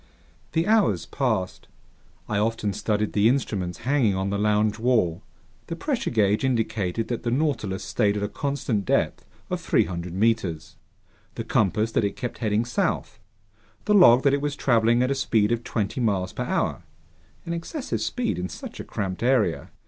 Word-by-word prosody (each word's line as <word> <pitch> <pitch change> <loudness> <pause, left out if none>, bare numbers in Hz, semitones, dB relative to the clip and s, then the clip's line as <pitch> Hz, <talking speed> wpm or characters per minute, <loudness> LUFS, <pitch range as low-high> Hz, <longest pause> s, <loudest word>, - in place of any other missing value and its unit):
The 165 0 +1
hours 195 - +2
passed. 110 -5 -2 0.6
I 105 - 0
often 110 -1 0
studied 105 +1 -1
the 105 +2 +4
instruments 100 -9 -2
hanging 130 -7 +2
on 95 +1 -1
the 100 - -1
lounge 105 +1 +1
wall. 110 -9 +1 0.5
The 165 - -4
pressure 265 - -2
gauge 105 -2 +2
indicated 110 -5 -1
that 120 -2 -2
the 120 - -2
Nautilus 125 -8 -1
stayed 105 -3 +1
at 105 - -2
a - - 0
constant 125 -2 -2
depth - - 0 0.2
of - - -2
300 85 -1 0
meters, 95 -5 0 0.6
the - - -4
compass 105 +3 +1
that 110 - +1
it 100 -1 -1
kept 120 - -5
heading 110 +1 +1
south, 120 -2 -2 0.7
the 210 - +2
log 135 - +7
that 140 -1 +4
it 140 - +1
was 145 -1 -2
traveling 120 -2 +3
at 125 - 0
a - - +3
speed 110 -5 +1
of 120 0 0
twenty 105 +2 -2
miles 95 -5 0
per - - -3
hour, - - -1 0.6
an 170 - -3
excessive 250 - -4
speed 245 - -1
in 90 +1 -3
such - - -9
a - - -4
cramped 95 -3 -4
area. 125 -9 +1
110 Hz, 170 wpm, -25 LUFS, 100-130 Hz, 0.7 s, log